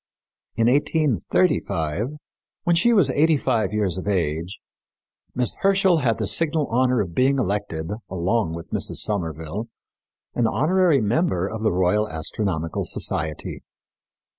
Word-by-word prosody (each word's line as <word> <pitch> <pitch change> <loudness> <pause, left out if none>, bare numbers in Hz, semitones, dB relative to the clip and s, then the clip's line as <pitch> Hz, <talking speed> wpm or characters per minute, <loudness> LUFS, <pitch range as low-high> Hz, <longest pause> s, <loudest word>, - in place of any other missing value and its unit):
In 115 - +2
1835, 120 - +1 0.5
when 175 -2 +2
she 235 +8 +3
was 190 - +4
eighty 155 +3 +3
five 120 -5 0
years 100 -4 -1
of 95 - -7
age, 85 -2 -1 0.8
Miss 125 -1 0
Herschel 195 -3 +3
had 120 -5 +1
the - - -2
signal 160 -2 +1
honor 125 0 +2
of 90 -4 -5
being 135 +5 +2
elected, 100 -8 -2 0.2
along 95 0 0
with 85 - -9
Mrs. - - -1
Somerville, 90 +1 -2 0.7
an 120 -2 +1
honorary 155 - +2
member 105 - +1
of 110 +1 -6
the 110 - +2
Royal 95 +4 +1
Astronomical 80 0 -3
Society. 80 -1 -2
110 Hz, 130 wpm, -23 LUFS, 90-140 Hz, 0.8 s, was